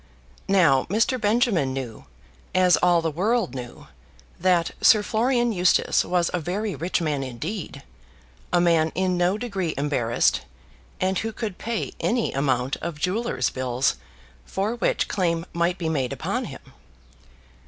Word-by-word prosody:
Now 165 -9 +4
Mr. 225 +5 +1
Benjamin 205 - +2
knew, 125 -5 -6 0.5
as 185 -1 +5
all 175 -2 +3
the 165 - 0
world 205 - 0
knew, 125 -2 -8 0.5
that 175 -2 +2
Sir 215 -2 +6
Florian 240 +2 +1
Eustace 180 -4 +3
was 175 -1 0
a 180 - 0
very 195 +6 -2
rich 175 +2 -1
man 150 -4 -1
indeed; 135 - -6 0.7
a 175 - +3
man 165 -2 +3
in 185 0 +1
no 180 +3 +1
degree 195 -8 -3
embarrassed, 135 -5 +1 0.6
and 185 0 +1
who 225 - -3
could 215 -4 -5
pay 230 -1 -3
any 235 -1 0
amount 135 -1 0
of 165 -3 -6
jewellers' 185 - 0
bills 130 0 0 0.5
for 200 - -2
which 240 - 0
claim 170 -4 0
might 170 +2 0
be 170 - -3
made 135 -6 -1
upon - - -2
him. - - -11
175 Hz, 145 wpm, -24 LUFS, 145-205 Hz, 0.7 s, Sir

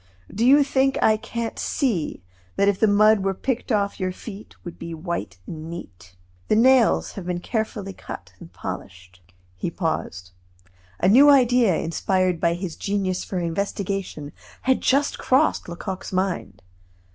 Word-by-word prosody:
"Do 220 - -1
you 280 +4 +7
think 270 -1 +1
I 220 - +4
can't 230 +1 -5
see 190 - -1 0.3
that 200 - +2
if 200 -1 +2
the 220 - +4
mud 215 +1 +5
were 195 0 0
picked 250 +4 -3
off 200 -2 0
your 185 -1 -1
feet 205 +2 -10
would 175 - -8
be 165 0 -6
white 155 - -4
and 160 0 -7
neat? 90 - -10 0.3
The - - +3
nails 250 +1 +4
have 185 -3 -8
been 180 -1 -1
carefully 210 -1 -3
cut - - -9
and - - -12
polished 90 0 -8 0.2
" 90 0 -35
He - - -1
paused. 95 - -3 0.7
A 180 - +2
new 265 +9 +7
idea 245 - +5
inspired 180 +2 0
by 170 +1 +2
his 175 -2 -5
genius 195 -2 -2
for 190 - -5
investigation 180 -3 -3 0.3
had 260 0 +2
just 280 +2 +1
crossed 265 - +2
Lecoq's 185 +2 -6
mind. 185 - -2
195 Hz, 155 wpm, -23 LUFS, 170-225 Hz, 0.7 s, you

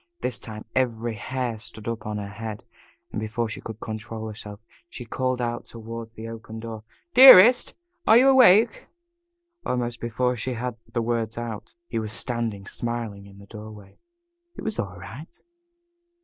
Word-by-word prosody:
This 125 -2 -1
time 110 -2 -8
every 120 -3 0
hair 120 +1 -3
stood 110 0 -10
up 115 -2 -4
on 105 0 -3
her 100 -1 -5
head, 105 +1 -7 0.5
and - - -3
before 115 +2 -2
she - - -5
could 110 -1 -8
control 110 0 -6
herself, 105 -1 -8 0.3
she 120 - -8
called 130 +1 -1
out 120 -1 -2
toward 115 0 -8
the 110 +1 -7
open 115 -1 -8
door: 110 -1 -7 0.3
"Dearest, 245 -2 +9 0.3
are 220 - +8
you 260 +3 +6
awake?" 235 -4 +6 0.8
Almost 120 -1 -2
before 125 +2 0
she 125 +2 -3
had 125 0 -4 0.2
the 115 0 -1
words 115 -1 -2
out 115 -3 -6
he 115 -9 -3
was 110 -1 -4
standing 115 -5 -3
smiling 115 -3 -4
in 100 0 -15
the 100 - -13
doorway. 105 -1 -11 0.6
It - - -8
was 220 - -3
all 95 -4 -4
right. 120 - -10
115 Hz, 165 wpm, -25 LUFS, 110-125 Hz, 0.8 s, Dearest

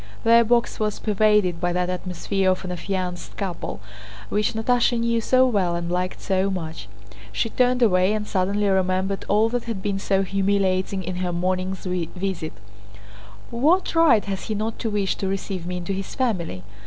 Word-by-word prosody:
Their 230 +1 +6
box 235 +1 +1
was 215 -1 -1
pervaded 210 -5 +2
by 175 0 +1
that 180 0 0
atmosphere 185 +1 -1
of 185 +1 0
an 180 - -4
affianced 180 0 -4
couple 190 - -4 0.5
which 210 0 0
Natásha 240 +1 +2
knew 230 0 +1
so 255 +3 +4
well 195 -8 +1
and 170 0 -3
liked 180 +1 -2
so 190 0 +1
much. 165 -4 -5 0.4
She 230 - -1
turned 250 0 +2
away 185 -2 +4
and 215 -1 -2
suddenly 200 +1 0
remembered 190 0 0
all 215 +2 +4
that 245 0 -2
had 220 -5 -4
been 200 -1 -1
so 195 0 +1
humiliating 195 0 0
in 180 +1 -4
her 180 -1 -1
morning's 185 +2 -2
visit. 180 -1 -3 1.0
"What 310 +11 +2
right 320 -10 +5
has 195 -1 -4
he 215 - -2
not 215 +2 -3
to 225 - -1
wish 205 -2 0
to 195 - -2
receive 190 -2 -3
me 180 0 -3
into 180 +2 -3
his 195 0 -5
family? 180 - -1
195 Hz, 175 wpm, -23 LUFS, 185-215 Hz, 1.0 s, Their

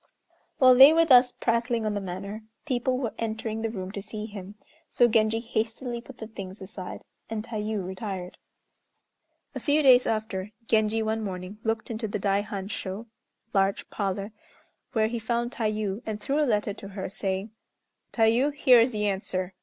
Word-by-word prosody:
While 255 -1 +7
they 270 +4 +9
were 330 0 +5
thus 250 -4 +7
prattling 230 -1 0
on 215 - 0
the 205 - -2
matter, 195 +3 -6 0.2
people 255 -2 0
were 235 -5 -2
entering 220 0 -3
the 225 - -1
room 190 -4 -5
to 200 - -5
see 210 +1 -6
him, 205 -2 -9 0.3
so 240 - +4
Genji 220 -1 +2
hastily 235 +1 -3
put 250 +1 -13
the 220 - -7
things 195 -3 -8
aside, 190 -1 -8 0.3
and 220 -1 -3
Tayû 215 -3 -3
retired. 190 -1 -6 1.1
A - - -4
few 295 +1 +2
days 255 -2 +7
after, 215 -2 -2
Genji 220 0 +2
one 220 +1 -1
morning 185 +1 -6
looked 225 +1 -2
into 220 0 -3
the 205 - -2
Daihan 200 0 -1
sho 200 +1 -5 0.5
(large 195 0 +1
parlor), 200 0 -2 0.6
where 220 -2 +3
he 230 +2 -2
found 235 +2 -1
Tayû, 215 -3 -2
and 215 -1 -3
threw 275 +7 -1
a 295 - +2
letter 210 -2 +1
to 195 - -10
her, 195 -1 -5
saying, 195 +1 -3 0.6
"Tayû, 235 +5 +3
here 255 -4 +6
is 230 +3 +4
the 210 -3 -2
answer. 190 -2 -2
220 Hz, 170 wpm, -27 LUFS, 200-235 Hz, 1.1 s, they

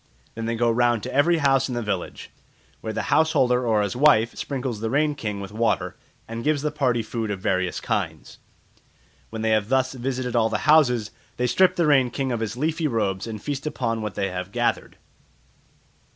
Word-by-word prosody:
Then 115 0 -5
they 115 - -1
go 120 0 +2
round 120 -1 +2
to - - -5
every 165 +5 +3
house 135 -3 +2
in 125 - -3
the 120 - -2
village, 100 -4 -4 0.5
where 110 - -5
the - - -3
house 160 0 +3
holder 125 -1 +2
or 110 -2 +3
his 100 +1 -3
wife 125 -5 +4
sprinkles 130 -5 -4
the 110 +1 -2
Rain 150 +4 +2
King 105 -7 -4
with 100 0 -7
water, 115 +2 0 0.3
and 115 +1 -6
gives 150 -1 +1
the 150 - 0
party 125 -6 0
food 110 0 -4
of 100 -2 -3
various 95 -1 -1
kinds. - - -4 0.9
When 110 0 -5
they 110 - +1
have 110 -1 +1
thus 130 0 +1
visited 125 -1 -3
all 115 -1 +3
the - - 0
houses, 125 -8 +4 0.3
they 125 - 0
strip 185 +9 +3
the 170 - +2
Rain 135 -4 +4
King 135 +1 -2
of 120 - -1
his 110 +1 -4
leafy 160 +3 0
robes 105 -6 -1
and 110 -2 -5
feast 145 +4 -4
upon 115 -6 -2
what 105 -2 -5
they 95 -1 -1
have 90 +1 -5
gathered. - - -1
120 Hz, 205 wpm, -24 LUFS, 110-135 Hz, 0.9 s, wife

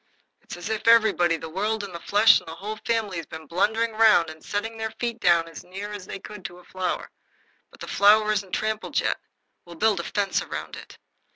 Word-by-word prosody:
It's - - -9
as 175 +4 -6
if 220 0 -3
everybody, 215 -7 +5
the 160 - -7
world 205 +6 -2
and 195 -3 -7
the 170 - -6
flesh 205 +5 +5
and - - -19
the 160 - -7
Whole 210 +5 -6
Family, 220 -5 0
had 165 - -6
been 160 0 -8
blundering 220 +8 +1
round 215 -7 +4
and 155 0 -14
setting 220 +2 -3
their 220 0 -3
feet 235 0 -4
down 170 -3 +3
as 165 - -10
near 195 +3 -7
as 200 -3 -8
they - - -5
could 200 0 -10
to 175 - -7
a 180 - -16
flower. 185 -1 -3 0.6
But - - -19
the - - -6
flower 215 +1 +5
isn't 200 -3 -2
trampled 215 0 -1
yet. - - 0 0.4
We'll 175 -1 -12
build 210 +2 +2
a - - -3
fence 200 +1 -1
round - - -6
it." - - -12
205 Hz, 220 wpm, -25 LUFS, 175-220 Hz, 0.6 s, everybody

